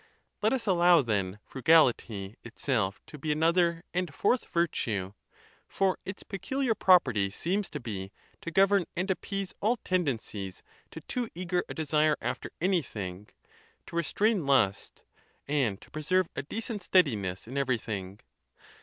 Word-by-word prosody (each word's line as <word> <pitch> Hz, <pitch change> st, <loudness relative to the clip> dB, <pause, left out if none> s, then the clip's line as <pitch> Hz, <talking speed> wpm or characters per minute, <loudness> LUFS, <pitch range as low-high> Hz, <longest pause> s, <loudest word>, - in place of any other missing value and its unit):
Let 215 Hz, +1 st, +3 dB
us 260 Hz, -4 st, -1 dB
allow, 175 Hz, -4 st, +5 dB
then, 100 Hz, -4 st, -1 dB
frugality 120 Hz, -8 st, +2 dB
itself 115 Hz, -4 st, -1 dB
to 150 Hz, -, -11 dB
be 155 Hz, +2 st, -1 dB
another 170 Hz, +2 st, +2 dB
and 180 Hz, -2 st, -1 dB
fourth 225 Hz, -, +1 dB
virtue; 110 Hz, -, -1 dB, 0.5 s
for 190 Hz, -1 st, 0 dB
its 190 Hz, 0 st, -6 dB
peculiar 260 Hz, +5 st, -1 dB
property 130 Hz, -, +4 dB
seems 185 Hz, -, -2 dB
to 150 Hz, -, -5 dB
be, 100 Hz, -6 st, -5 dB, 0.3 s
to -, -, -5 dB
govern 195 Hz, +2 st, +4 dB
and 185 Hz, +3 st, 0 dB
appease 195 Hz, 0 st, -3 dB
all 230 Hz, +4 st, +2 dB
tendencies 120 Hz, -, -2 dB, 0.3 s
to -, -, -9 dB
too 245 Hz, -3 st, -3 dB
eager 180 Hz, 0 st, -1 dB
a -, -, -6 dB
desire 155 Hz, -1 st, +2 dB
after -, -, -3 dB
anything, 105 Hz, -, -2 dB, 0.6 s
to -, -, -10 dB
re 170 Hz, -, +3 dB
strain 205 Hz, -1 st, +1 dB
lust, 115 Hz, -8 st, +1 dB, 0.4 s
and 130 Hz, -9 st, +1 dB
to -, -, -17 dB
preserve 170 Hz, +4 st, +1 dB
a -, -, -2 dB
decent 215 Hz, -, -5 dB
steadiness 110 Hz, -, +1 dB
in 130 Hz, -, -7 dB
every 130 Hz, -3 st, +1 dB
thing. 100 Hz, -3 st, -6 dB
155 Hz, 145 wpm, -29 LUFS, 110-185 Hz, 0.6 s, allow